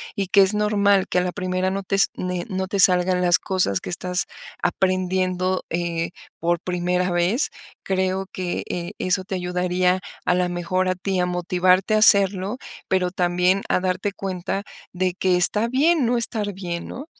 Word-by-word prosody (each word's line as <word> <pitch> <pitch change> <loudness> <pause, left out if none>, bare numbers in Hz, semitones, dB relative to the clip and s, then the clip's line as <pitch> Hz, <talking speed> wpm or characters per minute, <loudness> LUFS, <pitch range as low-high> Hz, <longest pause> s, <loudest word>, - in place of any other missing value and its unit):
y 200 -3 -2
que 200 - +6
es 195 +2 +4
normal 205 -2 +2
que 180 - +1
a - - +2
la 180 - -2
primera 185 +1 -2
no 195 +1 -3
te 195 - -1
es 195 - +6
ne 180 -1 -3
no 190 0 -2
te 200 +1 -3
salgan 180 0 +4
las 175 0 +5
cosas 180 - 0
que - - -6
estás 180 +1 -1 0.4
aprendiendo, 185 0 0
eh, 170 0 -2 0.3
por 170 0 0
primera 180 0 -1
vez. 175 +10 +1 0.3
Creo 190 0 -1
que, 180 -1 -3
eh, 175 -1 -4
eso 185 0 +1
te 190 - -5
ayudaría 180 0 0 0.3
a - - +3
la 180 -1 0
mejor 175 +1 -1
a 185 - 0
ti, 190 +1 -2
a 180 - +1
motivarte 180 +2 +1
a 215 - +3
hacerlo, 200 0 +4 0.3
pero 180 -1 +1
también 180 +1 +1
a - - +2
darte 185 +2 -1
cuenta 195 0 -4 0.3
de 185 0 0
que 185 -1 +1
está 210 +5 +2
bien 285 +4 +2
no 245 +1 +1
estar 220 -3 -1
bien, 175 -3 -5
¿no? 275 - -8
185 Hz, 180 wpm, -22 LUFS, 180-195 Hz, 0.4 s, que